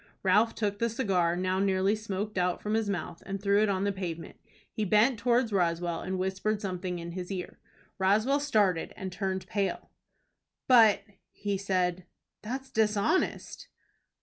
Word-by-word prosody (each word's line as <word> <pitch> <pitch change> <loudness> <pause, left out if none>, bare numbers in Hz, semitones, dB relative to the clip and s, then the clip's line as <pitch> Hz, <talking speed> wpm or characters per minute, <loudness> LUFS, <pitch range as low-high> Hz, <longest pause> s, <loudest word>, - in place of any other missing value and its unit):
Ralph 210 +4 +3
took 205 -2 -2
the 235 - +1
cigar, 190 -8 +1
now 185 +1 0
nearly 195 +1 +2
smoked 210 -1 -4
out, 180 0 0
from 210 - -3
his 220 -2 +1
mouth, 175 -3 -4
and 195 +1 -4
threw 200 +1 +3
it 215 - +2
on 190 -1 0
the 200 - +1
pavement. 175 -4 -6 0.4
He 215 - -2
bent 215 +4 +3
towards 235 0 +2
Roswell, 170 -2 0
and 185 +1 -3
whispered 190 +3 -1
something 185 -2 -3
in 170 0 -6
his 180 +1 -6
ear. 185 -2 -5 0.4
Roswell 215 +9 +3
started 210 - +1
and 190 -2 -5
turned 190 -1 -3
pale. 195 0 -2 0.8
"But," 225 -5 +6 0.3
he 205 -1 -3
said, 185 -2 -1 0.3
"that's 265 +5 -5
dishonest." 215 - 0
195 Hz, 155 wpm, -29 LUFS, 185-215 Hz, 0.8 s, But